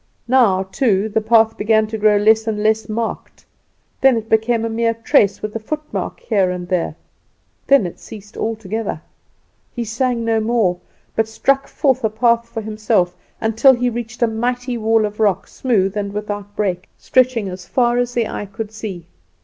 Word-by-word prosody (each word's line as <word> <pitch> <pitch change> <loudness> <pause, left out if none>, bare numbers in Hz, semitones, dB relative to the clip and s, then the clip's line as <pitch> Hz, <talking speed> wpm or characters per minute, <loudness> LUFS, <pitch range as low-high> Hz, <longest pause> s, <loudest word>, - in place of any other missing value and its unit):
Now 230 -7 +4
too 200 +1 0
the 220 +1 0
path 225 0 +3
began 220 +1 +3
to 220 +1 -5
grow 210 0 +4
less 220 +2 +3
and 210 -1 -1
less 220 +1 +1
marked; 225 +1 -4 0.6
then 270 -3 +5
it 225 0 -5
became 225 +1 +2
a - - 0
mere 230 0 0
trace, 210 -3 +2
with 215 0 -4
a - - -1
footmark 305 - -5
here 200 - +1
and 180 -1 -4
there; 175 -4 -1 0.7
then 275 -7 +5
it 175 - -7
ceased 210 0 -12
altogether. 220 -4 -3 0.8
He 240 - -2
sang 235 +1 -1
no 225 -1 +2
more, 215 -5 +1 0.4
but 225 0 +1
struck 270 +5 +1
forth 265 -3 0
a 220 - +2
path 235 +1 +1
for 225 - -5
himself, 215 -4 0 0.2
until 230 +3 +4
it 245 0 +2
reached 235 0 -4
a - - +4
mighty 245 +3 -2
wall 225 -1 +2
of 210 +1 -6
rock, 205 -4 +2
smooth 205 -6 0
and 200 -1 -3
without 205 -1 -5
break, 185 -4 -2
stretching 255 -5 +2
as 180 -1 -8
far 240 -1 +2
as 245 0 -1
the 235 -2 +1
eye 205 - -5
could 225 -1 -5
see. 210 -6 -7
220 Hz, 180 wpm, -19 LUFS, 210-235 Hz, 0.8 s, then